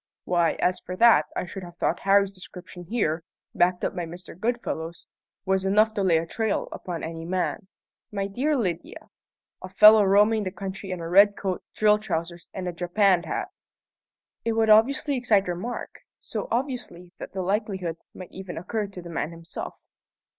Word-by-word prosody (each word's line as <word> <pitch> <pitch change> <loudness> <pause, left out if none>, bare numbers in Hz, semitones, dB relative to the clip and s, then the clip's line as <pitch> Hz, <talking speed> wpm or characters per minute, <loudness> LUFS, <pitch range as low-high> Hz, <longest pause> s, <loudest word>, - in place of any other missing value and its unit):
"Why, 175 -2 +2
as 180 0 0
for 180 - -7
that, 185 -8 +6
I - - -2
should 195 +2 -7
have 175 -1 -11
thought - - 0
Harry's 200 0 +3
description 180 -1 -10
here, 170 -6 -1 0.3
backed 180 0 +2
up - - -2
by 175 -2 -3
Mr. 175 +1 -10
Goodfellow's, 185 -6 -3 0.4
was 190 0 +1
enough 210 +3 +3
to 210 - -1
lay 180 -4 +4
a 165 - -1
trail 220 +5 -2
upon 175 -3 -6
any 165 0 -5
man. 185 +3 -2 0.4
My 200 -1 -2
dear 260 +10 0
Lydia, 180 -8 -4 0.5
a 185 - -8
fellow 210 +2 +8
roaming 210 +3 +4
the 190 - -2
country 190 +1 -6
in 180 -2 -4
a 165 - -4
red 200 +4 +6
coat, 190 -2 -2
drill 210 0 +4
trousers, 170 -4 -4
and 185 -1 -5
a 175 - -3
japanned 180 +1 +2
hat!" - - -3 0.9
"It 230 - 0
would 220 -1 +3
obviously 275 +6 +4
excite 215 -6 +2
remark: 180 +8 -5 0.2
so - - -5
obviously 245 - -3
that - - -8
the 190 -1 -2
likelihood 190 -4 -2 0.2
might 185 - -10
even 190 -2 -8
occur 210 +5 -3
to 190 -3 -10
the 170 - -9
man 155 -2 -2
himself." 165 0 -8
190 Hz, 175 wpm, -25 LUFS, 175-210 Hz, 0.9 s, fellow